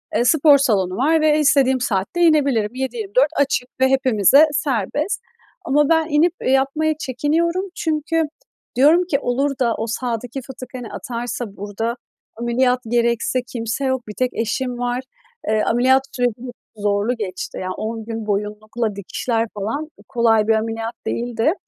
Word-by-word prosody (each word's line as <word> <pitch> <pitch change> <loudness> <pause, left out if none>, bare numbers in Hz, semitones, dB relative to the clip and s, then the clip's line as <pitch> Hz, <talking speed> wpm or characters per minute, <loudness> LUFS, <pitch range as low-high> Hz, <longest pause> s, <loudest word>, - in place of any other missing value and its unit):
eee, - - +3
spor 295 +1 +6
salonu 195 -9 +1
var 310 +6 +3
ve 310 0 +4
istediğim 270 -3 +3
saatte 210 - -1
inebilirim. 280 -10 +3
7-24 255 +1 0
açık 270 -3 +1
ve 265 - +6
hepimize 265 - +5
serbest. 290 - -1 0.4
Ama 295 -1 +2
ben 320 -1 +3
inip 315 +3 +3
yapmaya 275 +4 +2
çekiniyorum 320 +8 0
çünkü 320 +1 0 0.5
diyorum 300 +8 +5
ki, 290 -6 0
olur 275 +2 0
da 235 -3 +2
o 220 - -3
sağdaki 240 +2 -3
fıtık, 255 -1 -10
hani, 245 -3 -7
atarsa 240 0 -4
burada 205 +4 -3 0.4
ameliyat 245 +2 +1
gerekse 235 +1 +1
kimse 230 +3 -3
yok, 260 -3 -1
bir 210 - -6
tek 255 -1 +1
eşim 245 +2 -2
var. 245 +1 -2 0.5
Eee, 215 0 +2
ameliyat 260 +3 +4
süreci 245 -2 +1
çok 240 -4 -12
zorlu 205 +4 +1
geçti. 185 -4 -5
Yani, 185 0 -3
10 225 0 -4
gün 225 -1 -5
boyunlukla, 210 +2 -2
dikişler 225 +4 -2
falan 225 +10 -3 0.2
kolay 225 -4 +3
bir 225 - +4
ameliyat 225 +1 -2
değildi. 240 +5 0
245 Hz, 145 wpm, -20 LUFS, 225-280 Hz, 0.5 s, spor